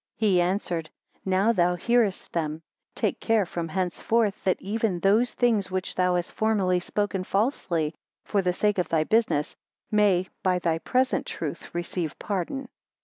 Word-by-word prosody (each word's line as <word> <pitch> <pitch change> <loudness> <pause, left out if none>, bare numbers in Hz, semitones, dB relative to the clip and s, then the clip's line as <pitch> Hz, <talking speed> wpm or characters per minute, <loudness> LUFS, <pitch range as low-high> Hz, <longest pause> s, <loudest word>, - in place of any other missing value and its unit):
He 200 -5 +3
answered, 175 -3 -1 0.4
Now 190 +4 +3
thou 180 -3 +2
hearest 225 +1 +1
them 160 -1 -2 0.3
Take - - -1
care 225 -3 +2
from 170 -1 -4
henceforth, 195 +5 0
that 185 - +2
even 210 -1 -1
those 210 +7 +3
things 220 -6 +2
which 185 0 -3
thou 180 -1 +2
hast 175 0 -2
formerly 200 -5 +2
spoken 195 +1 -2
falsely 185 - 0 0.3
for 200 - +1
the 180 -1 +1
sake 205 +2 +1
of 180 - -1
thy 160 -2 +2
business, 215 -7 +1 0.4
may, 200 -4 +3
by 185 -3 +2
thy 165 -2 0
present 255 +8 +1
truth - - -6
receive 175 -2 -3
pardon. 210 +8 -3
185 Hz, 150 wpm, -26 LUFS, 175-215 Hz, 0.4 s, He